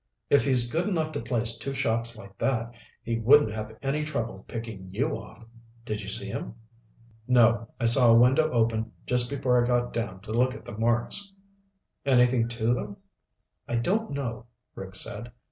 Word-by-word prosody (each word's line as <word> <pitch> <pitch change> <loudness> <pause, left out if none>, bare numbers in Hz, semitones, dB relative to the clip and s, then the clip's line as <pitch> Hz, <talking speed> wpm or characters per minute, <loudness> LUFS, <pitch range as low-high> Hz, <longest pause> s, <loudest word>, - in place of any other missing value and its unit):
If 140 -3 +5
he's 125 -3 +3
good 170 +6 0
enough 160 -5 -1
to 145 - -3
place 115 -1 -1
two 135 0 -4
shots 115 -3 0
like 100 -2 -12
that, 115 -3 0 0.3
he 115 0 -2
wouldn't 130 +1 +5
have 110 0 -6
any 145 +3 0
trouble 115 -10 -4
picking 110 -5 -7
you 135 +11 -1
off. 115 - -11 0.4
Did 105 -2 -3
you 100 - -8
see 100 0 0
him?" 100 +2 -5 0.7
"No. 115 -2 +4
I 120 - 0
saw 120 +1 +5
a 115 - +7
window 130 +6 +5
open 115 -3 0
just 125 -1 +1
before 125 -3 +2
I - - -1
got 120 0 +1
down 115 -5 -4
to 105 - -9
look 125 +3 +2
at - - -11
the - - -8
marks." 120 - 0 0.7
"Anything 125 -3 +3
to 115 0 0
them?" 105 -4 -4 0.7
"I 120 - -2
don't 200 - 0
know," 125 -4 -4 0.3
Rick 95 0 -8
said. 110 +5 -2
120 Hz, 180 wpm, -27 LUFS, 110-130 Hz, 0.7 s, a